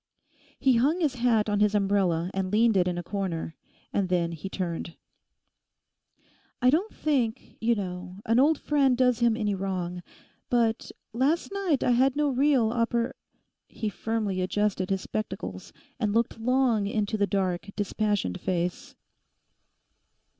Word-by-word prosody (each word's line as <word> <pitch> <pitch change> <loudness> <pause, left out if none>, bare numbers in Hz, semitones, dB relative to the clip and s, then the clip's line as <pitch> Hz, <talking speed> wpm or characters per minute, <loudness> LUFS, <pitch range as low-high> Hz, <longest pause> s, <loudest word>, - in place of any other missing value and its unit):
He 265 -3 +4
hung 290 +9 +2
his 305 -6 +1
hat 235 -3 +2
on 205 -1 +1
his 210 0 +3
umbrella 190 -4 +1
and 190 -1 -2
leaned 225 +1 +4
it 180 -2 +3
in 175 -1 -1
a 175 - -3
corner, 170 -4 -3 0.4
and 195 -2 0
then 175 -2 +1
he 170 +4 -6
turned. 170 -3 -4 1.6
'I 250 +1 +4
don't 360 +9 +1
think, 255 -7 -1
you 235 +1 +3
know, 180 -2 -5
an 230 +2 +3
old 300 +3 +4
friend 275 -5 +2
does 250 -2 +3
him 235 -2 +3
any 210 -3 0
wrong; 185 -2 -3 0.5
but 230 -2 +1 0.2
last 280 +11 +1
night 385 -8 0
I - - +3
had 260 +3 +3
no 295 0 +2
real 265 -4 +3
oppor—' 235 0 0 0.5
He 215 - -4
firmly 210 -1 -2
adjusted 190 0 0
his 195 -1 0
spectacles, 215 +3 -5 0.3
and 210 -4 0
looked 230 0 0
long 240 -3 +2
into 210 0 -1
the 205 -1 +1
dark, 190 -2 -1
dispassioned 205 - -1
face. 180 -1 -2
215 Hz, 145 wpm, -27 LUFS, 190-245 Hz, 1.6 s, He